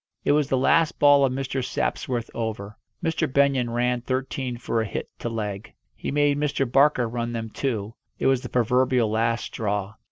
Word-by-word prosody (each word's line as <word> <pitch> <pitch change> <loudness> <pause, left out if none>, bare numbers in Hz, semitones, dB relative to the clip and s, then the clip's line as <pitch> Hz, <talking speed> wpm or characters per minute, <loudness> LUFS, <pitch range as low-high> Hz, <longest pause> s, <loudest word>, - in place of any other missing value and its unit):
It - - +4
was 145 -1 +2
the 135 - +2
last 160 +5 +3
ball 145 -1 +6
of 135 - +3
Mr. 135 0 -2
Sapsworth's 120 -1 -2
over. 105 -3 -4 0.3
Mr. 160 -3 0
Benyon 135 -3 +2
ran 120 +1 0
thirteen 130 0 -3
for 115 -1 -1
a 110 - -2
hit 95 - -5
to 120 - -3
leg. 105 -3 -5 0.2
He - - -5
made 145 0 +2
Mr. 145 -2 0
Barker 135 -1 +3
run 120 +1 -3
them 115 -1 -4
too 110 -6 -3 0.2
it - - -3
was 135 -2 +3
the - - -7
proverbial 125 -1 +2
last 115 +1 +1
straw. 105 -2 -3
125 Hz, 185 wpm, -24 LUFS, 115-135 Hz, 0.3 s, ball